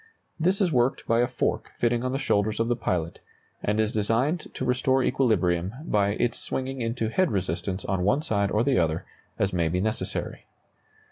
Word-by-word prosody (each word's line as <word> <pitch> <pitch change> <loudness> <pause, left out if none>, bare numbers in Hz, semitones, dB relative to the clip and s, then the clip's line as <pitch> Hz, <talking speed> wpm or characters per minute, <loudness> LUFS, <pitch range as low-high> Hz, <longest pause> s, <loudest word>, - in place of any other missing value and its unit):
This 185 +5 +2
is 180 -4 +3
worked 125 -1 +1
by 115 0 +2
a 120 - +3
fork 125 - -2
fitting 120 0 +1
on 130 - -1
the 135 - 0
shoulders 110 -5 +1
of 115 +1 +1
the 120 - +2
pilot, 85 -7 -2 0.4
and 105 +1 0
is 110 -1 +2
designed 115 - 0
to - - -3
restore 130 +1 +2
equilibrium 100 -9 +1
by 100 -7 +2
its 120 -1 0
swinging 130 0 -3
into 115 -1 -1
head 185 +8 +2
resistance 95 0 -2
on 95 -1 -1
one 135 +10 +2
side 100 -8 +1
or 105 +3 +2
the 135 -1 +3
other 80 -1 0 0.3
as 100 -1 0
may 85 -2 +1
be 90 +3 0
necessary. 110 +3 -3
115 Hz, 190 wpm, -26 LUFS, 100-130 Hz, 0.4 s, is